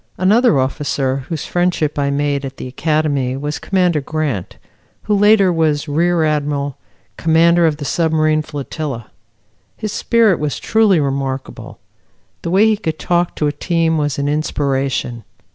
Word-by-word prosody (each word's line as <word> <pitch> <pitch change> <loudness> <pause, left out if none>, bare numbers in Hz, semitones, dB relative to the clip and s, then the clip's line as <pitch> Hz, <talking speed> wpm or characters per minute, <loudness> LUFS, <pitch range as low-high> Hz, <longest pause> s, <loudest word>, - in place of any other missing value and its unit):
Another 215 - +3
officer 135 0 -1
whose 160 -3 -4
friendship 175 -4 0
I 140 0 +1
made 140 0 -1
at 135 0 -7
the - - -6
Academy 140 -2 -1
was 145 +2 -4
Commander 180 -5 +1
Grant, 140 - -3 0.5
who 210 - 0
later 205 -2 +4
was 155 -2 0
Rear 165 +3 +1
Admiral, 145 -2 -1 0.4
Commander 165 +1 +4
of 150 -2 -1
the 145 - -6
Submarine 155 0 +1
Flotilla. 145 -4 -6 0.7
His 215 -1 -4
spirit 225 -6 +2
was 150 -1 -2
truly 220 -5 +3
remarkable. 135 -2 -4 0.6
The - - -4
way 195 +5 +4
he 220 -1 +3
could 160 -7 -3
talk 175 +1 0
to 150 - -1
a 145 - +1
team 165 +1 0
was 145 -2 -1
an 140 0 -1
inspiration. 135 -5 -1
155 Hz, 145 wpm, -17 LUFS, 140-175 Hz, 0.7 s, later